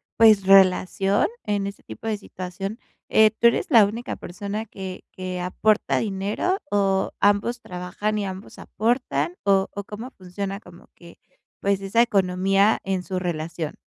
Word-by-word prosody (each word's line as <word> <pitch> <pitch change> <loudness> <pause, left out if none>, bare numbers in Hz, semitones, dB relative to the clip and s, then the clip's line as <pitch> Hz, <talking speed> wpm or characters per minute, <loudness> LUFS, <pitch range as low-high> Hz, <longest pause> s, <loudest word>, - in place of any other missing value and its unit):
pues, 215 -3 +6
relación, 195 +1 +4 0.2
en 200 -1 -1
este 200 - -9
tipo 225 - -9
de 215 - 0
situación, 195 +3 -7 0.3
eh, 220 -1 +5
¿tú 230 +1 +3
eres 235 - +1
la 230 -7 +7
única 230 +4 -4
persona 205 +4 -5
que 190 -3 -8
que 185 -1 -5
aporta 210 +4 +1
dinero, 205 - -1
o 195 -1 +1
ambos 205 +4 +2
trabajan 185 +4 -4
y 205 - -1
ambos 190 +1 -8
aportan? 215 - -1
O 195 -1 +3
o 200 - -5
cómo 220 +6 -8
funciona 195 +2 -6
como 175 -1 -16
que, 170 -1 -15 0.4
pues, 200 -1 0
esa 195 +4 +2
economía 195 -1 +2
en 190 -2 -1
su 185 0 -3
relación. 165 -2 -4
195 Hz, 150 wpm, -23 LUFS, 185-215 Hz, 0.4 s, la